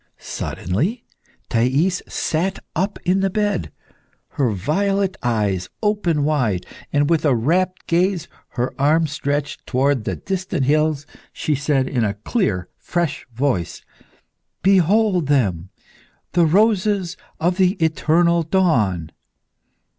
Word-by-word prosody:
_ - - -40
Suddenly 165 - -3 0.4
Thais 135 +10 +1
sat 180 +5 -1 0.2
up 195 +5 -1
in 185 +2 +3
the 195 0 +1
bed. 205 - -1 0.6
Her 135 -4 0
violet 190 - 0
eyes 105 -6 0
opened 175 -8 +1
wide, 125 -12 0 0.3
and 145 0 +2
with 165 -1 +2
a 145 -5 +3
rapt 180 +10 0
gaze, 180 0 +1 0.3
her 125 +1 -1
arms 155 +1 +3
stretched 145 -1 -3
towards 130 -2 +1
the - - -1
distant 190 -6 -2
hills, 150 0 +1 0.3
she 155 - -1
said 140 -1 +1
in 125 -4 0
a 100 -2 0
clear, 105 - -1
fresh 170 -7 -2
voice 120 - -1 0.8
"Behold 190 -2 +3
them 95 - +1 0.6
the 170 -2 +3
roses 200 -1 +2 0.2
of 175 +3 +1
the 185 -1 +4
eternal 170 0 +2
dawn!" 115 - +1
155 Hz, 120 wpm, -21 LUFS, 130-185 Hz, 0.8 s, the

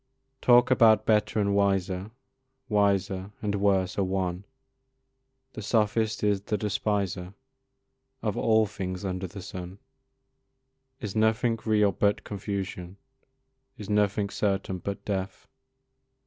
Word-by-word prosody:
Talk 120 +1 +5
about 110 -3 +5
better 110 0 +2
and 100 -1 +1
wiser, 95 -1 +1 0.6
Wiser 100 -2 +1
and 105 -1 -2
worse 100 -1 +1
are - - +3
one, 95 0 -2 1.1
The 110 - -6
sophist 110 0 +1
is 100 -2 +2
the 105 +1 -2
despiser 100 -3 -2 0.9
Of 105 -3 -1
all 110 -1 +3
things 95 -2 -5
under 95 0 -3
the 95 +1 -9
sun; 90 0 -7 1.2
Is 105 -5 -5
nothing 110 +1 +2
real 105 -2 +3
but 100 +1 +1
confusion? 95 -2 -5 0.8
Is 105 0 -6
nothing 105 -1 +1
certain 95 -2 -1
but 100 +2 -5
death? 95 -2 -3
100 Hz, 115 wpm, -27 LUFS, 95-105 Hz, 1.2 s, Talk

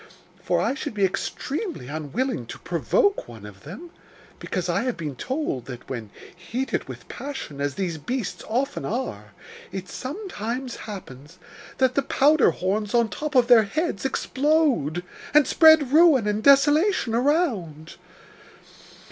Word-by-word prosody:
For - - 0
I - - +1
should 285 -4 -5
be 200 -2 +3
extremely 270 - -4
unwilling 160 - -3
to - - -8
provoke 405 -5 0
one 110 -3 -11
of 100 -2 -12
them, 245 - -9 0.5
because - - -3
I - - +1
have 250 - -2
been 150 -5 -5
told 255 - -3
that, 125 -2 -9
when 115 -5 -6 0.3
heated 230 +9 -3
with - - -10
passion, 265 - -7
as 145 -1 -1
these 175 -5 -3
beasts 245 - -4
often 255 +5 -1
are, 105 - -4 0.4
it 190 -1 -6
sometimes 255 - -5
happens 155 -5 -10 0.4
that 260 -1 +2
the 280 - +2
powder 290 +2 +4
horns 205 +4 -2
on 235 -2 +3
top 300 +3 -5
of 250 -2 +6
their 240 -2 +7
heads 310 - -2
explode, 265 - +1 0.3
and 300 -2 +7
spread 315 -4 +6
ruin 305 -7 +6
and 210 +1 0
desolation 290 - +4
around. 230 - 0
240 Hz, 140 wpm, -24 LUFS, -, 0.5 s, their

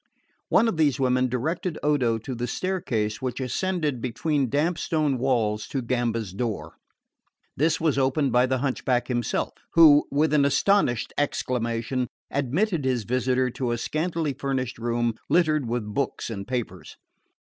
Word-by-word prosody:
One 230 - +4
of 225 - -1
these 150 -3 +2
women 130 -1 +2
directed 155 - -2
Odo 130 -6 +2
to 115 +4 -6
the 120 0 -3
staircase 115 - -2
which 130 -1 -3
ascended 150 0 -1
between 135 +2 -1
damp 155 +6 0
stone 150 -5 0
walls 110 -4 0
to 135 -3 -3
Gamba's 115 -5 -1
door. 110 +1 -4 0.8
This 160 +3 +1
was 155 -4 +1
opened 135 +1 +1
by 125 +2 +4
the 130 0 +1
hunchback 125 -1 -1
himself, 120 -2 -1 0.2
who, 155 -3 +7
with 150 +2 +1
an 145 -2 +4
astonished 140 - +2
exclamation, 125 -2 -1 0.2
admitted 150 - 0
his 130 -3 0
visitor 125 +2 0
to 125 -1 -3
a 120 - 0
scantily 160 +3 -2
furnished 130 -3 -3
room 120 0 0 0.2
littered 155 -6 +2
with 120 -1 -2
books 135 -2 -2
and 100 -3 -6
papers. 125 -2 -5
130 Hz, 150 wpm, -25 LUFS, 120-150 Hz, 0.8 s, who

